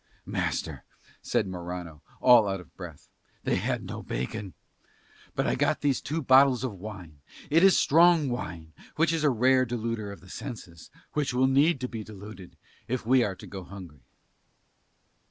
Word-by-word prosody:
"Master," - - -3 0.4
said - - 0
Morano, 90 -4 -7 0.2
all 120 -4 +7
out 95 -1 -2
of 90 -6 -16
breath, - - -10 0.4
"they - - +1
had - - -2
no - - -6
bacon. 85 - -5 0.8
But - - 0
I - - +1
got 145 +2 0
these 140 -3 +1
two 155 +2 -3
bottles 130 -1 +5
of 130 -5 -2
wine. 90 -7 -9 0.3
It 165 +4 +5
is 195 -1 +6
strong 165 0 +5
wine, 85 -10 -5 0.2
which 165 +1 +2
is 160 -2 -1
a 150 - +5
rare 130 +1 +3
deluder 115 -3 -3
of 100 - -10
the 95 - -16
senses, 100 - -8 0.2
which 145 -4 -1
will 130 +1 +4
need 140 +3 +3
to 125 - -1
be 115 -3 -6
deluded 100 -3 -11 0.3
if 125 -2 -3
we 125 +1 +4
are 100 -4 -2
to - - -12
go 95 -2 -8
hungry." 90 -7 -11
115 Hz, 170 wpm, -27 LUFS, 95-135 Hz, 0.8 s, all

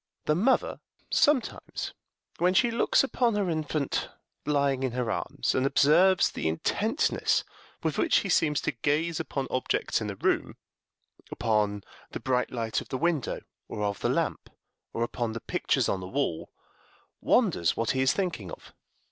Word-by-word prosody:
The 150 - +3
mother 220 +12 +1 0.3
sometimes, 290 -5 +1 0.5
when 180 +2 +3
she 240 +3 +4
looks 230 - +3
upon 245 -4 +1
her 200 -4 0
infant 155 -3 -2 0.4
lying 140 -2 +1
in 130 -3 -1
her 125 -2 -1
arms, - - -1
and 130 - +1
observes 165 +7 +4
the - - -3
intentness 80 +1 +1 0.4
with - - -1
which - - +3
he - - -4
seems 150 -2 +2
to - - -1
gaze 150 +6 0
upon 140 -3 -3
objects 130 -2 0
in 110 - -3
the 100 - -4
room - - 0 0.7
upon 105 -3 0 0.3
the - - -6
bright 125 -1 0
light 115 -3 -2
of - - -12
the 130 - -2
window 165 -2 -1 0.3
or 105 - -4
of 100 -1 -1
the - - 0
lamp, - - -1 0.4
or 115 - -1
upon 120 -1 -2
the 115 - -4
pictures - - 0
on 95 - 0
the 90 - -7
wall 130 - -2 0.7
wonders 85 -1 +2
what 115 0 +1
he 130 - 0
is 130 - +4
thinking 170 - -3
of. - - -11
135 Hz, 165 wpm, -28 LUFS, 115-170 Hz, 0.7 s, she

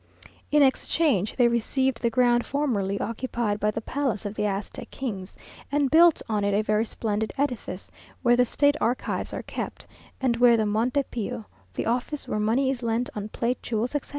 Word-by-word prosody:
In 295 -1 +5
exchange 265 - +1
they 245 -2 +5
received 235 +2 0
the 235 - +2
ground 240 0 +3
formerly 210 -9 -1
occupied 230 -2 -2
by 210 - +1
the 220 +1 -3
palace 255 -4 -2
of 205 - -3
the 210 -1 -1
Aztec 200 0 -4
kings, 200 -8 -5 0.3
and 285 -2 +1
built 335 +1 +6
on 210 -2 0
it 200 0 +1
a 210 - +2
very 215 +1 +1
splendid 220 -1 -2
edifice, 245 -9 -3 0.3
where 240 -1 +5
the 250 - +4
state 285 +4 +2
archives 245 +2 -1
are - - -5
kept, - - -6 0.3
and 245 -3 +1
where 240 -1 +6
the 220 - +1
Monte 235 +7 +1
Pio 230 0 -4 0.3
(the - - -2
office 250 +5 -2
where 215 - -1
money 240 +6 +2
is 255 -2 -4
lent 235 +1 -1
on 210 0 -4
plate, 240 +3 -2
jewels, 230 +3 -2
etc.) 290 - -3
235 Hz, 185 wpm, -26 LUFS, 215-260 Hz, 0.3 s, built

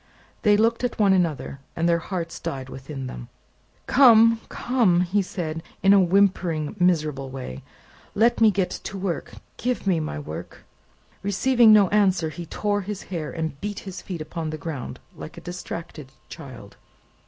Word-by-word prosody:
They 210 -2 +4
looked 230 +3 +2
at 245 - -1
one 200 -3 +4
another, 165 -6 -1 0.2
and 165 +1 0
their 170 0 +3
hearts 170 -1 -5
died 135 -1 -5
within 135 +1 -7
them. - - -8 0.6
"Come, 230 -3 +6
come!" 205 -9 +2 0.2
said 170 -4 -4
he, 165 - -7 0.2
in 195 - +7
a 200 - +7
whimpering 180 -4 +1
miserable 155 -6 +1
way; 130 - -7 0.5
"let 230 +3 +3
me 220 - +7
get 195 -3 0
to 195 - -6
work. 185 -3 -3 0.2
Give 250 -1 -2
me 185 -4 +2
my 155 - -4
work." 75 +2 -8 0.6
Receiving 230 +4 +4
no 210 -2 +7
answer, 190 -6 +2
he 170 +3 -8
tore 205 +4 -1
his 200 0 -6
hair, 160 -3 -3
and 160 -4 -4
beat 205 -1 -4
his 185 -2 -8
feet 175 -4 -6
upon 160 +1 -4
the 155 - -4
ground, 150 -4 -6 0.2
like - - -10
a - - -8
distracted 165 -5 -7 0.2
child. 130 -10 -11
175 Hz, 165 wpm, -24 LUFS, 155-205 Hz, 0.6 s, in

